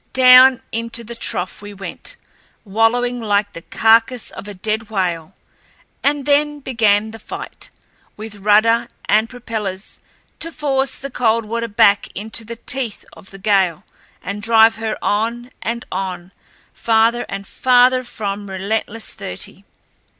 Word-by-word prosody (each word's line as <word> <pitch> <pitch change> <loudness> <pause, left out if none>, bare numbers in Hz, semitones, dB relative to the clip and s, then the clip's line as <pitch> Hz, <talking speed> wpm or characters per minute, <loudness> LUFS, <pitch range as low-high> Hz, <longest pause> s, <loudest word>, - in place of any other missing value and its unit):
Down 255 0 +7
into 230 +1 -3
the 235 +1 -8
trough 190 -5 -2
we 205 0 -9
went, 195 0 -6 0.5
wallowing 235 +4 +1
like 205 -1 0
the 170 - -8
carcass 225 +5 +2
of - - -9
a 205 - -7
dead 215 +3 -3
whale, 180 -4 -2 0.7
and 285 -1 +1
then 295 0 +2
began 220 -5 +1
the 225 - -10
fight, - - -8 0.5
with 215 0 -8
rudder 215 +3 +3 0.2
and 220 +2 +2
propellers, 215 -6 -6 0.4
to 330 - -4
force 275 -3 -1
the 275 0 -7
Coldwater 230 -1 0
back 205 -2 +4
into 220 +3 -4
the 230 +2 -7
teeth 240 -1 -3
of 190 - -15
the 195 - -12
gale 190 -4 +1 0.4
and 200 +2 -5
drive 225 +1 +5
her 225 -1 -3
on 235 +4 -1
and 235 +2 -3
on, 185 -1 -4 0.4
farther 230 +1 +2
and 195 0 -5
farther 255 +2 +3
from 205 -4 -5
relentless 210 +3 -3
thirty. 90 - -7
225 Hz, 135 wpm, -19 LUFS, 205-240 Hz, 0.7 s, Down